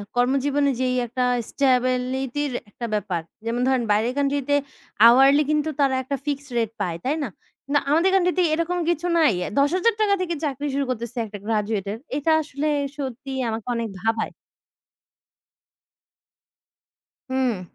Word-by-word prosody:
কর্মজীবনে 275 +3 +2
যেই 255 -1 +1
একটা 250 +2 -2 0.3
স্ট্যাবিলিটি 255 0 +1
র - - -3 0.2
একটা 235 - -6
ব্যাপার। 185 -5 -1 0.2
যেমন 235 +2 -1
ধরেন 260 -2 +2
বাইরের 220 +4 +2
কান্ট্রি 285 0 +1
তে 285 - +4 0.5
আওয়ারলি 270 +5 +6
কিন্তু 305 +1 +1
তারা 275 -2 +3
একটা 280 +2 -2
ফিক্সড 285 -1 -3
রেট 225 -2 0
পায়। 170 -2 -1
তাই 275 +4 +1
না? 265 - -3 0.4
না 290 - +5
আমাদের 330 +6 +4
কান্ট্রি 360 -2 +3
তে 365 - +4
এরকম 335 +2 0
কিছু 345 0 0
নাই। 310 -8 +4 0.3
৳১০০০০ 400 +8 +2
থেকে 345 -2 -1
চাকরি 290 -1 -2
শুরু 280 0 0
করতেছে 235 0 -4
একটা 210 -1 -8
গ্র্যাজুয়েটর। 210 -2 -1 0.2
এটা 295 +2 +1
আসলে 290 0 -3 0.3
সত্যিই 270 0 -5
আমাকে 225 0 -4
অনেক 230 -1 -2
ভাবায়। 225 0 0 3.0
হুম। 255 -6 0
265 Hz, 140 wpm, -23 LUFS, 235-290 Hz, 3.0 s, আওয়ারলি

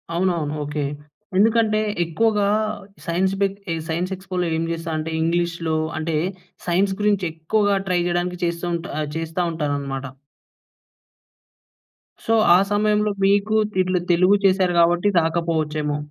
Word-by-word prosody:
అవునవును 170 -4 0
ఓకే, 145 0 -3 0.5
ఎందుకంటే 220 0 +3 0.2
ఎక్కువగా, 205 +5 +1 0.6
సైన్స్ 185 +3 +1
ఏక్ 195 - -10 0.3
సైన్స్ 175 +4 -2
ఎక్స్‌పోలో 185 -1 -3
ఏం 165 - -1
చేస్తా 165 0 -4
అంటే, 160 +1 -3
ఇంగ్లీష్‌లో 170 -1 0 0.2
అంటే 160 0 -2 0.5
సైన్స్ 190 +3 +2
గురించి 205 -3 +2
ఎక్కువగా 200 +5 +1
ట్రై 180 -1 +2
చేయడానికి 175 0 -1
చేస్తుంటారు 170 -3 -3
చేస్తా 165 +2 -3
ఉంటారు 150 -3 -2
అన్నమాట. 135 -1 -5 2.2
సో, 225 - +2 0.2
ఆ - - +7
సమయంలో 210 0 +2
మీకు, 200 +2 +2 0.2
తెలు 185 -1 +1
తెలుగు 185 +4 +5
చేసారు 185 -2 +3
కాబట్టి 175 +3 +3
రాకపోవచ్చేమో. 160 -3 -1
175 Hz, 115 wpm, -22 LUFS, 160-195 Hz, 2.2 s, ఆ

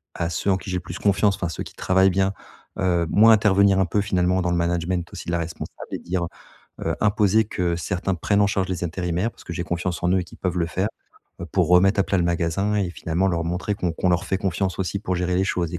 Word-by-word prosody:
à 85 0 -1
ceux 100 - 0
en 95 - +2
qui 95 - -9
j'ai 90 - 0
le 90 - -3
plus 85 +1 -7
confiance 100 0 +2
enfin, 85 -3 -3
ceux 80 - -6
qui - - -12
travaillent 95 +1 +3
bien, 95 +1 +1 0.5
heu, 85 -2 +2
moins 110 +2 +6
intervenir, 100 -2 +4
un 95 - +3
peu, 105 +4 0
finalement, 95 -2 +1
dans 90 - 0
le 85 - +1
management 85 +1 -1
aussi 95 - -8
de 85 - -2
la 85 - +1
responsable 85 0 -6
et - - -3
dire, 90 0 -2 0.6
heu - - 0
imposer 105 0 +3
que 90 -5 -1
certains 95 +2 -2
prennent 100 +4 +1
en - - +4
charge 95 -2 -1
les 90 -1 -3
intérimaires. 90 +5 -1
Parce - - -18
que - - -6
j'ai 85 - -3
confiance 90 0 -3
en 90 - +2
eux 95 - +3
et - - -5
qu'ils - - -15
peuvent 90 -1 -2
le 85 - +1
faire, 95 +4 -1 0.5
heu, - - -5
pour - - +1
remettre 95 +3 +5
à 95 - +3
plat 100 - 0
le - - +2
magasin 85 +4 0
et 95 -4 0
finalement 85 +2 -1
leur 85 -2 -1
montrer 90 +4 -2
qu'on 90 -4 -1
qu'on 90 +2 0
leur 90 +3 +1
fait 95 +1 -1
confiance 95 0 -1
aussi 95 +1 -2
pour 95 -3 -2
gérer 90 0 -1
les 95 - +2
choses 85 -4 -1
et - - -2
90 Hz, 265 wpm, -23 LUFS, 85-100 Hz, 0.6 s, moins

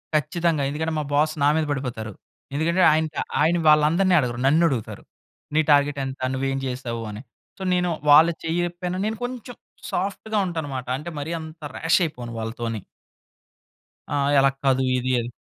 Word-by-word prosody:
ఖచ్చితంగా. 160 0 +1
ఎందుకంటే 160 +3 -2
మా - - -1
బాస్ 155 +2 +2
నా - - +5
మీద 155 - +1
పడిపోతారు. 120 -6 -4 0.4
ఎందుకంటే 170 +5 +1
ఆయన, 160 +1 +2 0.4
ఆయన 165 +3 +3
వాళ్ళందరిని 165 +5 +4
అడగరు. 120 -3 -2
నన్ను 160 +5 +4
అడుగుతారు. 120 -7 -4 0.5
నీ 155 - +5
టార్గెట్ 145 0 +3
ఎంత? 135 0 -7
నువ్వేం 135 +1 -1
చేసావు 120 -2 -4
అని. 105 +2 -8 0.4
సో, 190 - -7
నేను 180 0 +1 0.2
వాళ్ళ 155 +3 +8
చెయ్యపోయిన 175 +2 -2
నేను 220 0 -2
కొంచెం 245 -1 -6 0.4
సాఫ్ట్‌గా 200 +3 -2
ఉంటాన్నమాట. 145 -7 -4
అంటే 150 +4 -7
మరీ 150 +4 -4
అంత 160 0 -10
రాష్ 165 +3 +3
అయిపోను 125 -7 -6
వాళ్ళతోని. 115 -1 -4 1.3
ఆహ్, 140 0 +1
అలా 135 0 +5
కాదు 135 -1 +3 0.2
ఇది 130 +1 -1
అది. 120 +1 -5
150 Hz, 150 wpm, -23 LUFS, 130-170 Hz, 1.3 s, వాళ్ళ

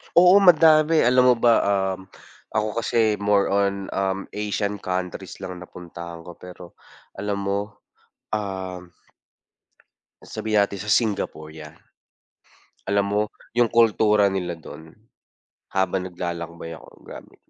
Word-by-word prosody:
Oo 180 +3 +8
madami 160 -4 +5
alam 125 +1 +4
mo 125 - +6
ba, 120 0 +3
um, 95 -2 -1 0.5
ako 110 0 +1
kasi 115 -2 +1
more 100 0 +2
on, 100 -1 0
um, 95 0 -2
Asian 105 0 -2
countries 90 -1 -5
lang 90 -1 -6
napuntahan 85 -1 -10
ko 85 0 -12
pero, 90 -1 -12 0.4
alam 100 0 -2
mo? 100 +1 -3 0.5
Um 95 -3 -5 1.3
sabihin 110 -2 0
natin 100 0 -3
sa - - -2
Singapore 100 -9 -1
yan. 80 0 -11 1.2
Alam 100 0 +2
mo, 105 - +3 0.3
yung 120 -2 +3
kultura 105 -3 +4
nila 95 -3 -3
dun, 80 0 -12 0.8
habang 95 -1 -1
naglalakbay 85 -2 -6
ako - - -15 0.2
grabe, - - -12
100 Hz, 120 wpm, -23 LUFS, 90-105 Hz, 1.3 s, Oo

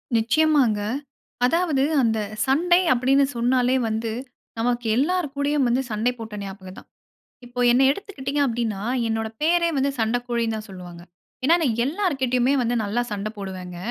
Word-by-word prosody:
நிச்சயமாங்க. 240 -2 +3 0.6
அதாவது 315 -2 +1 0.2
அந்த 225 -2 +1 0.3
சண்டை 350 +7 +3
அப்டின்னு 265 +3 +3
சொன்னாலே 250 +1 +2
வந்து, 220 +1 -2 0.5
நமக்கு 240 0 0
எல்லோர் 350 +5 +1
கூடயும் 285 -2 +1
வந்து 245 +3 +1
சண்டை 220 +3 +1
போட்ட 225 -2 -7
ஞாபகம் 190 -1 -9
தான். - - -18 0.6
இப்போ 245 +1 -8
என்னை 260 +2 +4
எடுத்துக்கிட்டீங்க 285 -5 -4
அப்டின்னா, 225 -5 -2 0.3
என்னோட 225 0 -1
பேரே 340 +1 +3
வந்து 275 +1 +1
சண்டக்கோழின்னு 235 0 -1
தான் 215 0 -8
சொல்வாங்க. 175 -2 -10 0.4
ஏன்னா 330 - +5
நான் 245 -8 0
எல்லார்கிட்டயுமே 270 -7 +1
வந்து 240 0 0
நல்லா 210 +4 -1
சண்ட 205 0 -3
போடுவேங்க. 185 -3 -7
245 Hz, 140 wpm, -23 LUFS, 220-280 Hz, 0.6 s, ஏன்னா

